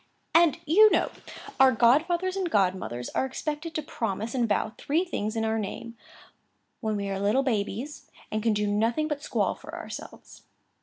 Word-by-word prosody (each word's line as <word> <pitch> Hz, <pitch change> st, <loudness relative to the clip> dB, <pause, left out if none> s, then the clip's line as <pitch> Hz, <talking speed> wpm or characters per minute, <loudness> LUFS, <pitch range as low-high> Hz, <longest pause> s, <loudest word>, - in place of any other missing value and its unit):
"And, 335 Hz, -2 st, +5 dB
you 425 Hz, +8 st, +7 dB
know, -, -, +1 dB, 0.5 s
our 265 Hz, -1 st, +7 dB
godfathers 330 Hz, -, +3 dB
and 380 Hz, -3 st, -1 dB
godmothers 180 Hz, -, 0 dB
are -, -, 0 dB
expected 305 Hz, +5 st, -4 dB
to 310 Hz, -, -1 dB
promise 225 Hz, -3 st, -3 dB
and 240 Hz, -4 st, 0 dB
vow 215 Hz, +1 st, 0 dB
three 325 Hz, +6 st, 0 dB
things 215 Hz, -, -3 dB
in 225 Hz, 0 st, 0 dB
our 220 Hz, 0 st, 0 dB
name, 230 Hz, +3 st, -6 dB, 0.8 s
when 220 Hz, -2 st, -1 dB
we 200 Hz, -1 st, -2 dB
are 195 Hz, 0 st, -2 dB
little 210 Hz, +7 st, +2 dB
babies, 240 Hz, +4 st, -3 dB, 0.2 s
and 215 Hz, -, -1 dB
can 225 Hz, 0 st, +2 dB
do 210 Hz, 0 st, 0 dB
nothing 225 Hz, +9 st, +1 dB
but 295 Hz, -2 st, -3 dB
squall -, -, 0 dB
for -, -, -10 dB
ourselves. -, -, -9 dB
235 Hz, 170 wpm, -27 LUFS, 210-305 Hz, 0.8 s, you